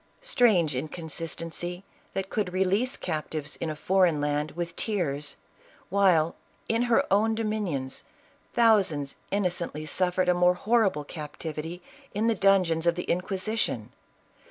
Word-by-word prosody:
Strange 220 - +3
inconsistency 165 +4 -4 0.3
that 195 0 -3
could 205 -4 -1
release 195 +8 +1
captives 155 -3 -4
in 165 - -3
a 155 - -3
foreign 180 -1 +3
land 145 +1 0
with 170 0 -4
tears, 150 -9 -1 0.5
while, 180 -5 +3 0.3
in 225 +1 +1
her 230 - +4
own 220 +2 +3
dominions, 205 -12 -2 0.5
thousands 195 -12 +3
innocently 175 -6 -1
suffered 180 +3 +1
a 180 - +5
more 180 0 +4
horrible 205 -6 +2
captivity 155 +3 -6 0.3
in 215 +2 +1
the 230 - +4
dungeons 185 -5 +3
of 170 - +4
the 180 - -3
Inquisition! 190 - -1
180 Hz, 125 wpm, -27 LUFS, 155-200 Hz, 0.5 s, a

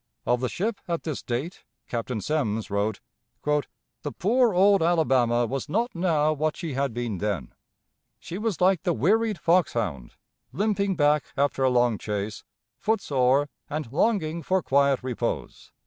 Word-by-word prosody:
Of 125 - +2
the 125 - 0
ship 210 +3 -2
at 170 -1 -2
this 155 -4 -4
date 130 +9 -4 0.2
Captain 115 -1 -3
Semmes 110 -7 -1
wrote: 100 +1 -1 0.4
"The 150 0 -3
poor 230 - +2
old 195 +1 +4
Alabama 130 -8 +3
was 135 +5 -4
not 230 +8 0
now 160 -4 +2
what 155 +1 -1
she 165 -5 -4
had 135 0 0
been 115 -4 -3
then. 100 -11 -3 0.6
She 180 - -7
was 220 -4 -1
like 185 -2 +3
the - - +1
wearied 215 - +2
fox 170 +3 +3
hound, 85 - -3 0.4
limping 200 +2 0
back 150 -3 +3
after 140 -1 +1
a 130 - +4
long 120 -3 +2
chase, 105 0 -4 0.4
foot 220 +1 +1
sore, 135 -3 +2 0.2
and 150 -5 -4
longing 170 -3 +1
for 185 +2 0
quiet 140 -1 +2
repose." 125 -2 -4
150 Hz, 155 wpm, -26 LUFS, 120-180 Hz, 0.6 s, old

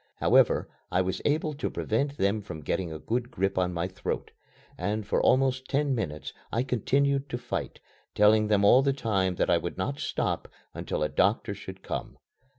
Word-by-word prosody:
However, - - +4 0.2
I 95 - +2
was 95 0 -3
able 155 +1 +1
to 145 - -3
prevent 140 +6 -1
them 100 +1 +1
from 80 -7 -8
getting 85 +4 -2
a 80 - -5
good 120 +8 -2
grip 95 -4 -1
on 90 -1 +1
my 85 0 -2
throat, 95 - -4 0.4
and 105 0 -2
for 105 - +1
almost 130 0 +3
ten 140 0 +1
minutes 85 -11 -4 0.2
I 115 - +1
continued 140 +3 +1
to 120 - -2
fight, - - -4 0.4
telling 105 +1 +5
them 105 -1 +3
all 125 +6 +7
the 135 0 +2
time 95 -8 0
that - - +1
I 85 - +4
would 85 - -5
not 140 +10 -2
stop - - -2 0.3
until - - -3
a - - +2
doctor 100 +2 +1
should 95 -1 -10
come. - - -5
110 Hz, 185 wpm, -28 LUFS, 95-135 Hz, 0.4 s, all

